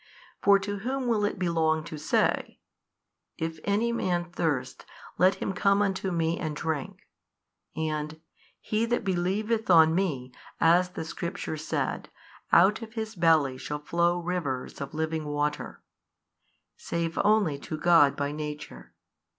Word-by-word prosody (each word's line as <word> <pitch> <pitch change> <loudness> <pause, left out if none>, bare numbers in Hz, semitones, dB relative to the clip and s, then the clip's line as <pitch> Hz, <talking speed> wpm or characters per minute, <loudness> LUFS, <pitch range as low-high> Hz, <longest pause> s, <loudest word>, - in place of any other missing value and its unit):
For 200 0 +6
to 205 +1 -4
whom 260 +5 -2
will 225 -4 +1
it 205 - -2
belong 165 -3 +1
to 155 - -7
say, 150 - 0 0.8
If 160 0 -4
any 210 +4 +1
man 175 -7 -1
thirst, 160 -7 -2 0.4
let 185 +2 +5
him 190 - -3
come 200 +2 +3
unto 190 -1 -1
Me 165 0 0
and 155 -2 -3
drink, 155 -3 -4 0.7
and, 155 0 -3 0.4
He 220 +2 -1
that 240 +1 0
believeth 200 +5 -1
on 160 -2 +7
Me, 145 -9 -1 0.3
as 175 +2 +4
the 160 - -6
Scripture 170 +1 -4
said, 155 +1 -3 0.4
out 195 +6 +5
of 220 -1 -9
his 220 -1 -4
belly 160 -7 +3
shall 150 - -4
flow 170 +3 +1
rivers 165 -9 -3
of 140 +2 -6
living 160 0 -2
water, 150 0 -3 0.9
save 170 0 -3
only 205 -9 +3
to 155 - -6
God 155 -4 +5
by 145 0 -2
Nature? 150 - -7
170 Hz, 140 wpm, -27 LUFS, 155-195 Hz, 0.9 s, on